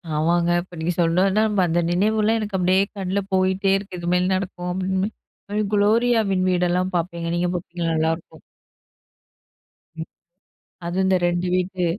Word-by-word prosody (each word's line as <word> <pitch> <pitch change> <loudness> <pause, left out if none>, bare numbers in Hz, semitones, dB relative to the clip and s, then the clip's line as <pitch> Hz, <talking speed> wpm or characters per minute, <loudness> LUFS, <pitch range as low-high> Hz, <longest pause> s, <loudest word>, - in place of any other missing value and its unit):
ஆமாங்க. 170 +2 +1
இப்ப 175 -1 -13
நீங்க 170 +2 -1
சொன்னோனே 190 +5 +2 0.2
அந்த 170 +1 +1
நினைவுலாம் 215 +4 +2
எனக்கு 205 -3 -3
அப்படியே 185 +1 +3 0.2
கண்ல 190 0 -1
போயிட்டே 190 +1 +2
இருக்கு. 195 -3 -8
இதுமேல 180 +2 +1
நடக்கும் 180 -2 -4
அப்படின்னு, 190 +2 -1 0.7
"குளோரியாவின் 210 -2 +2
வீடெல்லாம்" 180 +1 0
பார்ப்பேங்க. 170 0 -3
நீங்க 175 0 0
பார்ப்பீங்களா? 170 -1 -3
நல்லாயிருக்கும். 160 +1 -2 1.6
ம். 160 0 -5 0.8
அது 175 +2 -3
இந்த 190 0 +3
2 175 +1 -1
வீட்டு, 185 0 -1
185 Hz, 125 wpm, -22 LUFS, 175-195 Hz, 1.6 s, அப்படியே